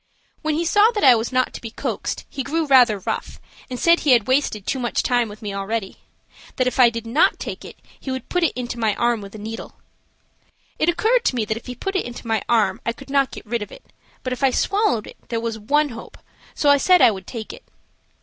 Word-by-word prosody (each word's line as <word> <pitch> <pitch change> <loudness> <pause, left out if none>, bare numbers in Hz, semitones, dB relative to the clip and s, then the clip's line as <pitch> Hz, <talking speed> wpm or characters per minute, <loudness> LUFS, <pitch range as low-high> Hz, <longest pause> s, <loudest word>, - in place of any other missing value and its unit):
When 310 -1 -1
he 335 +2 -1
saw 415 +6 +5
that 415 - -1
I 260 - +9
was 230 +1 -1
not 255 0 +1
to - - -8
be 230 - -6
coaxed - - -4
he 275 - -5
grew 315 +5 -1
rather 250 -6 +5
rough, 190 - -5 0.3
and 250 -1 -5
said 335 0 +4
he 285 - +4
had 235 -4 +4
wasted 255 -6 0
too 265 - -1
much 240 -2 -1
time 245 -2 +1
with 210 +1 -12
me 205 -1 -4
already. 195 +1 -3 0.6
That 255 - +1
if 255 - -2
I 245 -2 +8
did 230 -1 -6
not 235 +7 +2
take - - -6
it - - -10 0.2
he - - -7
would 260 -2 -4
put 360 -1 0
it 325 - 0
into 245 -1 -4
my 220 -3 +1
arm 235 -2 +1
with 200 +1 -10
a - - -7
needle. 220 +2 -7 1.0
It 315 - +3
occurred 450 +8 +2
to - - +2
me 230 -3 0
that 220 - -2
if 230 - -11
he 250 - -6
put 390 - -4
it 380 - +1
into 240 0 -8
my 225 -3 0
arm 230 -3 +2
I 235 - -1
could 275 +3 -13
not 275 -1 +3
get - - -10
rid 235 +1 -2
of 210 - -7
it, - - -15 0.3
but 255 - -2
if 250 - -7
I 270 - +4
swallowed 395 - +1
it - - -12
there 230 - -1
was 225 -1 -4
one 295 +8 +1
hope, 230 -2 -10 0.4
so 290 - +3
I 285 - +6
said 365 +5 +5
I 230 - +7
would 190 -3 -8
take 225 -3 -7
it. - - -13
245 Hz, 255 wpm, -21 LUFS, 225-285 Hz, 1.0 s, I